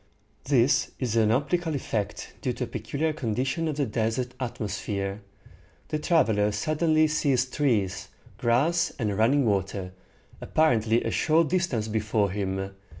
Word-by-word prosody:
This 130 -1 +2
is 120 -4 -2
an 110 -2 +4
optical 155 +6 0
effect 110 -6 -3
due - - -1
to - - -4
a - - -3
peculiar 155 +2 -2
condition 135 +4 -1
of 155 - -2
the 145 - +1
desert 115 +3 -1
atmosphere. 105 -4 -3 0.7
The 155 - -1
traveler 110 - +2
suddenly 155 +7 +2
sees 140 -4 +1
trees, 105 -8 0 0.3
grass, 140 +8 +2
and 105 -5 -1
running 125 +6 +3
water, 95 -2 -1 0.5
apparently 115 -7 +2
a - - -2
short 160 -1 +2
distance 170 -12 0
before 105 -2 0
him. 95 -1 -3
120 Hz, 135 wpm, -26 LUFS, 105-150 Hz, 0.7 s, an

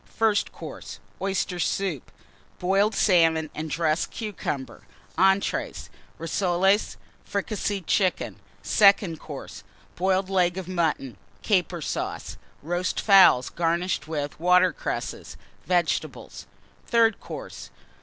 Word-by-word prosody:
FIRST 220 -2 +1
COURSE. - - -9 0.2
Oyster 190 -2 -1
Soup. 180 -6 -2 0.5
Boiled 195 +4 +1
Salmon 165 -5 +3
and 155 +1 -5
dressed 160 +1 0
Cucumber. 175 - -5 0.3
ENTREES. 195 +1 +1 0.3
Rissoles. 185 +4 +1 0.3
Fricasseed 200 -2 -3
Chicken. 185 0 0 0.3
SECOND 200 -5 +4
COURSE. - - -9 0.3
Boiled 190 +1 +1
Leg 180 -2 +1
of 190 -2 -5
Mutton, 160 - -1 0.3
Caper 180 -5 0
Sauce. - - -4 0.3
Roast 175 +3 -1
Fowls, 195 - +6
garnished 170 -2 -1
with 150 -2 -4
Water 180 +1 +4
cresses. - - -5 0.3
Vegetables. 175 -2 -1 0.4
THIRD 230 -2 +3
COURSE. - - -9
180 Hz, 100 wpm, -25 LUFS, 165-195 Hz, 0.5 s, Fowls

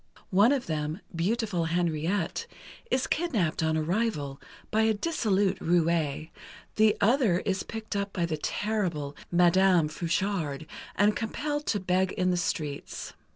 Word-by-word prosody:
One 205 +6 +5
of 275 -3 0
them, 155 +2 -2 0.2
beautiful 195 0 0
Henriette, 170 - -1 0.4
is 260 +1 +1
kidnapped 220 - 0
on 160 0 +1
arrival, 155 -5 -1 0.3
by 220 - +3
a 220 0 +3
dissolute 205 - +1
roué, 165 -3 +1 0.4
the 215 0 +4
other 220 -5 +3
is 190 -1 -1
picked 220 -2 -6
up 200 0 -1
by 175 -3 0
the 160 -2 -2
terrible 170 -6 -2 0.2
Madame 180 -1 +4
Frouchard 165 -3 -2 0.3
and 205 +1 +3
compelled 290 +7 -3
to 205 - +1
beg 185 0 +1
in 185 0 +1
the - - +1
streets. 155 -5 -3
185 Hz, 135 wpm, -28 LUFS, 165-215 Hz, 0.4 s, One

